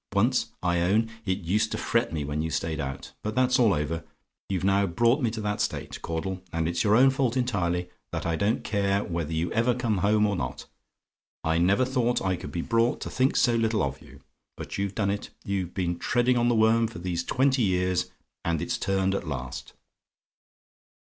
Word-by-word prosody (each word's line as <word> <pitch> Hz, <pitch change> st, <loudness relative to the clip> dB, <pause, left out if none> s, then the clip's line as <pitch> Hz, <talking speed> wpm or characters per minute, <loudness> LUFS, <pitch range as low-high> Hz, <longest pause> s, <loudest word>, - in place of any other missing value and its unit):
Once, -, -, +2 dB, 0.2 s
I 85 Hz, -1 st, +2 dB
own, 110 Hz, +6 st, +2 dB, 0.2 s
it 95 Hz, +2 st, 0 dB
used 105 Hz, +6 st, +1 dB
to -, -, -1 dB
fret 115 Hz, +1 st, 0 dB
me 75 Hz, -3 st, -2 dB
when 75 Hz, +2 st, -2 dB
you 80 Hz, -, -2 dB
stayed 80 Hz, +1 st, -2 dB
out; 65 Hz, -1 st, -5 dB
but 110 Hz, 0 st, -4 dB
that's 130 Hz, 0 st, +3 dB
all 115 Hz, -4 st, +5 dB
over: 80 Hz, 0 st, -1 dB, 0.5 s
you've 95 Hz, -2 st, -1 dB
now 100 Hz, +1 st, +3 dB
brought 115 Hz, -, +2 dB
me 120 Hz, -, +2 dB
to 110 Hz, 0 st, -5 dB
that 105 Hz, -1 st, -1 dB
state, -, -, -3 dB
Caudle 90 Hz, +3 st, -3 dB
and 80 Hz, -1 st, -1 dB
it's 85 Hz, 0 st, 0 dB
your 105 Hz, 0 st, +4 dB
own 135 Hz, +3 st, +6 dB
fault 130 Hz, -2 st, 0 dB
entirely 90 Hz, -8 st, 0 dB, 0.2 s
that -, -, -3 dB
I 85 Hz, -1 st, 0 dB
don't 100 Hz, +7 st, 0 dB
care 100 Hz, -1 st, +1 dB
whether 85 Hz, -2 st, -3 dB
you 80 Hz, +2 st, -1 dB
ever 115 Hz, +2 st, +2 dB
come 115 Hz, -6 st, 0 dB
home 105 Hz, +2 st, +3 dB
or 100 Hz, -1 st, +1 dB
not. -, -, -4 dB, 0.8 s
I 80 Hz, +1 st, +1 dB
never 100 Hz, +9 st, +3 dB
thought 125 Hz, -2 st, +1 dB
I 95 Hz, -1 st, 0 dB
could 85 Hz, -, -8 dB
be 85 Hz, -, -3 dB
brought 115 Hz, +1 st, +2 dB
to -, -, -5 dB
think 130 Hz, +1 st, +2 dB
so 120 Hz, -, +4 dB
little 115 Hz, -2 st, +1 dB
of 70 Hz, -, -3 dB
you; 70 Hz, +1 st, -15 dB, 0.4 s
but -, -, -6 dB
you've 100 Hz, 0 st, -2 dB
done 100 Hz, -2 st, +1 dB
it: 100 Hz, -, -4 dB, 0.2 s
you've 95 Hz, -3 st, -2 dB
been 85 Hz, -2 st, -1 dB
treading 120 Hz, +1 st, +2 dB
on 120 Hz, 0 st, +2 dB
the 120 Hz, -, +3 dB
worm 110 Hz, +1 st, +4 dB
for 115 Hz, -, -9 dB
these 85 Hz, -1 st, -2 dB
twenty 130 Hz, 0 st, +2 dB
years, 90 Hz, -3 st, +1 dB, 0.3 s
and 85 Hz, -2 st, 0 dB
it's 85 Hz, -, -2 dB
turned 95 Hz, 0 st, +1 dB
at 100 Hz, -, -3 dB
last. 65 Hz, -2 st, -5 dB
100 Hz, 210 wpm, -27 LUFS, 85-115 Hz, 0.8 s, own